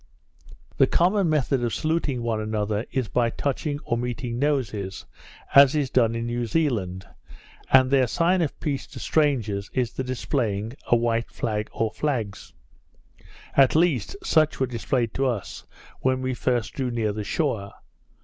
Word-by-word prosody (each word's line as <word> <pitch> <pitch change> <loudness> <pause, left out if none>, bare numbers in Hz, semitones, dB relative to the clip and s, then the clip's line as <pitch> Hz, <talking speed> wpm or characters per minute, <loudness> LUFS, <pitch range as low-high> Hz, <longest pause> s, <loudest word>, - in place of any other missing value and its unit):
The - - +5
common 185 +1 +2
method 135 -4 +1
of 120 - -1
saluting 155 -6 -1
one 115 -2 -1
another 110 0 -2
is 130 -4 -1
by 120 +1 +1
touching 145 +4 -2
or 120 -1 -1
meeting 120 0 -3
noses, 115 -10 -1 0.5
as 140 +1 +8
is 140 -4 0
done 115 -3 +3
in 115 0 -2
New 120 0 -2
Zealand, 105 - -1 0.7
and 130 0 +6
their 135 -2 +4
sign 175 +8 +2
of 155 - -2
peace 140 -3 -3
to - - -10
strangers, 115 -10 0
is 125 -3 0
the 130 - -3
displaying 120 -4 -2
a - - +5
white 115 -1 0
flag 105 -2 -3
or 110 -1 -1
flags; 120 -10 -3 1.0
at 135 0 +5
least 165 - +2
such 155 - +2
were 130 - +2
displayed 120 -1 -1
to 135 0 +1
us, 115 -6 -4 0.3
when 130 0 0
we 130 0 -1
first 120 -2 -1
drew 130 -2 -2
near 115 -3 -1
the 105 0 -4
shore. 110 -6 -1
125 Hz, 160 wpm, -25 LUFS, 115-140 Hz, 1.0 s, as